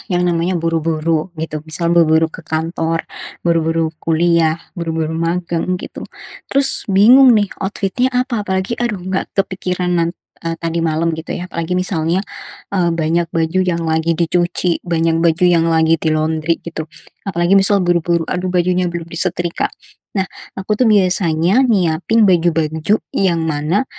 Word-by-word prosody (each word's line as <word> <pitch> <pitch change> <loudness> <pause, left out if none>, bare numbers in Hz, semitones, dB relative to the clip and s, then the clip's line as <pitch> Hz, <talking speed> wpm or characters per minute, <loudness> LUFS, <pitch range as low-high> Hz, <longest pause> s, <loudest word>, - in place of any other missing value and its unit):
yang 180 - +1
namanya 170 +2 0
buru-buru, 165 0 0
gitu, 155 -1 -4
misal 170 +2 -1
buru-buru 160 -1 +3
ke - - -10
kantor, 165 +1 -2 0.4
buru-buru 165 -1 +1
kuliah, 165 -1 +2 0.2
buru-buru 160 -1 -2
magang, 170 +2 -1
gitu, 180 - -8 0.4
terus 275 -4 +2
bingung, 235 +6 +6
nih, 205 -2 +1
outfit-nya 200 +5 -1
apa? 250 -3 0
Apalagi, 190 +5 -2
aduh 235 -3 -1
enggak 190 +1 -3
kepikiran 180 -2 -1
nan 170 -1 +1 0.3
e 165 0 -3
tadi 165 0 -3
malam, 165 0 0
gitu, 160 +1 -5
ya, 180 +1 -7
apalagi 170 +2 -2
misalnya, 180 0 0 0.5
eee, 175 -4 +1
banyak 165 +1 0
baju 165 +3 -1
yang 175 -2 0
lagi 160 +1 0
dicuci, 175 +1 0
banyak 165 -1 +1
baju 165 +1 +2
yang 170 -2 +4
lagi 160 0 +3
di-laundry, 155 +1 0
gitu. 160 -2 -6 0.4
Apalagi, 175 +2 +3
misal 195 -1 +2
buru-buru, 170 -1 +1
aduh, 180 +2 -3
bajunya 180 0 +1
belum 170 -1 -4
disetrika. 175 0 -1 0.5
Nah, 190 - +2 0.3
aku, 205 +3 -2
tuh, 250 - +4
biasanya 185 -1 +3
nyiapin 185 +1 +2
baju-baju 165 0 +2 0.2
yang 170 -4 +1
mana 160 - 0
170 Hz, 145 wpm, -17 LUFS, 165-185 Hz, 0.5 s, bingung